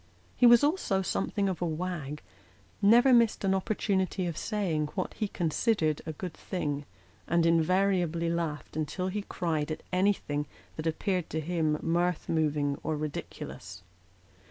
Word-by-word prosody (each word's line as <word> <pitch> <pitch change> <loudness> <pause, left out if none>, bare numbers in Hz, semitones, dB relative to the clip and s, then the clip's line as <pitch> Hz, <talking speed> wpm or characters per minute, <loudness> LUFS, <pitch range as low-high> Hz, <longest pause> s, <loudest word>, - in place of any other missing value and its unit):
He 245 - +6
was 240 +2 +7
also 285 - +1
something 200 +1 -1
of 185 -3 -2
a - - +1
wag; 155 -3 -4 0.6
never 240 +6 +6
missed 235 -3 +4
an 190 -1 +2
opportunity 190 -1 0
of 170 -2 -3
saying 175 -9 -1
what 185 - -2
he 215 - -2
considered 165 -2 0
a - - -1
good 175 +2 -6
thing, 145 -5 -3 0.4
and 170 -1 +3
invariably 170 0 +2
laughed 165 -4 -3
until 155 +4 -2
he 205 +2 -2
cried 165 -6 -2
at 155 - -5
anything 180 -6 +1 0.3
that 155 +1 -3
appeared 180 +2 -1
to 160 - -2
him 155 -1 0
mirth 175 0 0
moving 150 -3 0
or 155 0 -2
ridiculous. 95 -10 -6
170 Hz, 145 wpm, -29 LUFS, 155-195 Hz, 0.6 s, was